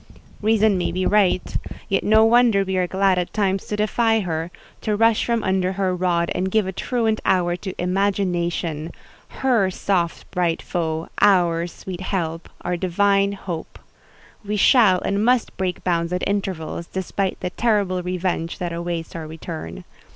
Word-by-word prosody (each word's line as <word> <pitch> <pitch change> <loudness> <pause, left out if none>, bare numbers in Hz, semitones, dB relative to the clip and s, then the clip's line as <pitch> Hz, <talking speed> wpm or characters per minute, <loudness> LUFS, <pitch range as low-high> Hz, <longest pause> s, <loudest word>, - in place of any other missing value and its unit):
Reason 215 -1 +3
might 175 -1 -2
be 185 0 0
right; 200 -3 +2 0.3
yet 195 - 0
no 220 +1 +5
wonder 230 -3 +4
we 190 0 -3
are 180 -1 +1
glad 190 0 +2
at 175 - -3
times 195 -2 0
to 210 - -2
defy 225 +1 +2
her, 165 -2 -3 0.3
to 215 -2 0
rush 225 +1 +3
from 235 -2 0
under 190 -1 +1
her 190 -1 0
rod 175 -2 0
and 185 +1 -1
give 215 +1 +2
a 190 - -3
truant 225 +2 -1
hour 175 -2 +2
to 190 0 -7
Imagination—her 180 - -1
soft, 180 -2 -2
bright 175 -3 0
foe, 160 -2 -3
our 175 -4 +4
sweet 180 +1 -8
Help, 165 -3 -3
our 180 0 -1
divine 195 +3 +2
Hope. 175 -4 -6 0.7
We 210 +1 -2
shall 205 -4 +5
and 200 +1 0
must 245 0 +2
break 185 -2 -3
bounds 170 -1 0
at 180 - -1
intervals, 185 -4 -3
despite 190 +1 -2
the 180 - -3
terrible 200 -5 +1
revenge 180 -2 -2
that 175 -1 -3
awaits 170 -1 -4
our 160 -2 -5
return. 155 - -7
185 Hz, 160 wpm, -22 LUFS, 175-205 Hz, 0.7 s, no